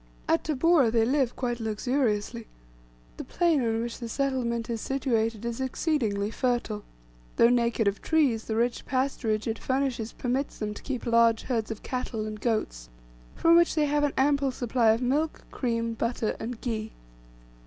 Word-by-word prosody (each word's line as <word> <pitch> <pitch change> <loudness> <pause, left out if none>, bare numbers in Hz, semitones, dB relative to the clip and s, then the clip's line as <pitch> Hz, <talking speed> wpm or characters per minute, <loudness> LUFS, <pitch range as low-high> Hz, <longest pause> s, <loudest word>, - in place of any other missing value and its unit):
At 165 - +2
Tabora 310 -3 +3
they 225 0 +3
live 260 -1 +1
quite 240 -2 -2
luxuriously. 225 0 -1 0.7
The - - -5
plain 330 -6 +1
on 225 0 0
which 235 0 -5
the 235 -2 -5
settlement 240 -3 -1
is 230 -2 -3
situated 230 -5 -1
is 235 +2 -3
exceedingly 235 -7 -1
fertile, 240 -4 -1 0.5
though 230 - +6
naked 235 -2 +2
of 200 0 0
trees; 275 -9 +2
the 220 - -2
rich 235 +2 0
pasturage 255 -5 0
it 225 -1 -2
furnishes 260 -4 -1
permits 260 +3 -2
them 210 -1 -3
to - - -10
keep 265 -3 -4
large 230 -1 +4
herds 230 -4 -2
of 220 -2 -6
cattle 250 -4 -3
and 215 -1 -6
goats, - - -2 0.5
from 330 0 +5
which 340 -1 +4
they 305 -2 +3
have 290 0 +1
an 290 - +1
ample 280 0 +3
supply 245 -2 +1
of 225 +3 +2
milk, 295 +5 0
cream, 230 -2 -1
butter, 230 -1 -1
and 230 +1 -5
ghee. 220 -3 -3
235 Hz, 165 wpm, -27 LUFS, 225-265 Hz, 0.7 s, though